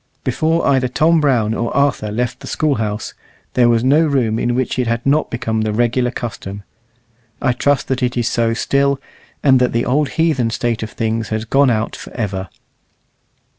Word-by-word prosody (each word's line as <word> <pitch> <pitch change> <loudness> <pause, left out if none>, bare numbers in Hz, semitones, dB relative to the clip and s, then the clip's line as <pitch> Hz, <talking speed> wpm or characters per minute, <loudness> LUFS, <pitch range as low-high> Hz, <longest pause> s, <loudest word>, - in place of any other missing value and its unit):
Before 160 +6 0
either 130 -2 +2
Tom 160 +5 +2
Brown 120 -7 +2
or 115 +1 -2
Arthur 135 -7 +1
left 120 +3 -2
the - - -10
School 155 -2 0
house, 105 0 -3 0.4
there 120 -2 +4
was 115 0 +2
no 140 +5 +4
room 125 -7 +1
in 120 0 0
which 130 0 -1
it 125 - 0
had 115 +1 -1
not 145 +3 +2
become 115 -2 -2
the 110 0 0
regular 120 +3 +1
custom. 105 -5 -6 0.8
I 130 - +1
trust 140 +2 0
it 125 -1 0
is 120 -1 +1
so 115 -1 +1
still, 140 +3 +1 0.4
and 130 -2 +5
that 125 0 +1
the 115 +1 +1
old 145 +3 +1
heathen 155 -8 +2
state 115 0 -2
of 110 - -4
things 110 +1 -2
has 110 0 -2
gone 135 +4 +3
out 110 -1 -1
for - - -10
ever. 95 -5 -3
120 Hz, 185 wpm, -18 LUFS, 115-135 Hz, 0.8 s, and